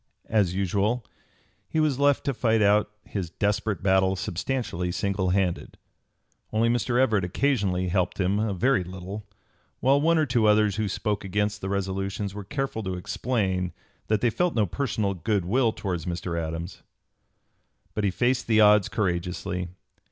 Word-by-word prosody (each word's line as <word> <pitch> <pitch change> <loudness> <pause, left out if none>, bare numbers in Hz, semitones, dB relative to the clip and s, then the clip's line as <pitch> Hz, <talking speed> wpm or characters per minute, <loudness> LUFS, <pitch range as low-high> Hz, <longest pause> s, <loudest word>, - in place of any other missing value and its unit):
As 100 -5 +2
usual 100 +5 0 0.6
he 160 - 0
was 150 -4 +1
left 145 -1 +3
to 140 - 0
fight 115 -3 +2
out 105 +1 +4
his 95 -5 -4
desperate 105 +1 -1
battle 95 0 +3
substantially 90 -1 -2
single 95 0 -1
handed. 90 -2 -1 0.7
Only 115 +2 +2
Mr. 120 +1 +1
Everett 110 -7 +3
occasionally 95 -3 0
helped 90 +1 0
him 95 +2 +1
a 110 -1 0
very 100 +3 +2
little; 95 +3 -8 0.5
while 135 +3 +3
one 165 +2 +3
or 155 - +3
two 120 -4 +2
others 105 -1 +3
who 110 -1 0
spoke 105 +1 -2
against 105 +2 -1
the 95 - -3
resolutions 95 +1 -2
were 105 0 -6
careful 135 +3 -3
to 95 -3 -3
explain 95 -2 -1 0.3
that 110 -1 +1
they 120 - +3
felt 175 +7 0
no 110 -3 +3
personal 110 -2 -1
good 95 +1 -1
will 115 +4 +2
towards 90 -5 -4
Mr. 85 0 -3
Adams. 80 +2 -4 1.1
But 105 - -2
he 100 - +3
faced 120 +6 0
the 110 -1 +4
odds 105 -2 +6
courageously. 90 -1 -2
100 Hz, 160 wpm, -26 LUFS, 95-115 Hz, 1.1 s, odds